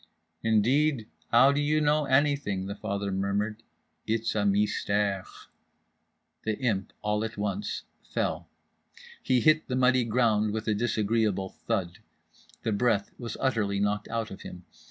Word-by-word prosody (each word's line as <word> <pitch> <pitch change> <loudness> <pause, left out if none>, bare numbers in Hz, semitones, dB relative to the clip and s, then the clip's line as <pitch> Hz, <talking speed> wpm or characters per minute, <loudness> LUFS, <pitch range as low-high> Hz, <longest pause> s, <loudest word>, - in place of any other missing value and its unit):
—"Indeed, 115 +3 +2 0.2
how 125 +4 +7
do 145 +1 +1
you 150 +1 +2
know 150 0 +2
anything?" 135 -8 +1
the 100 - -4
father 100 0 -3
murmured 100 +3 -1 0.5
quietly. 110 - +2
"It's 115 0 -2
a 110 - 0
mystère." 100 -1 +1 1.2
The 110 -1 -1
Imp, 105 -7 -1
all 105 0 0
at 110 -1 -5
once, 100 0 -3 0.3
fell. - - -1 0.7
He 125 -2 +2
hit 155 +5 +4
the 125 - -2
muddy 130 0 +4
ground 110 -3 +2
with 110 0 -4
a 110 - +3
disagreeable 105 -3 0 0.2
thud. 95 -7 -1 0.6
The 110 - 0
breath 105 -1 +1
was 115 -3 -5
utterly 105 -6 0
knocked 105 +1 0
out 115 -1 -3
of 95 - -9
him. 90 -1 -10
110 Hz, 145 wpm, -28 LUFS, 100-125 Hz, 1.2 s, how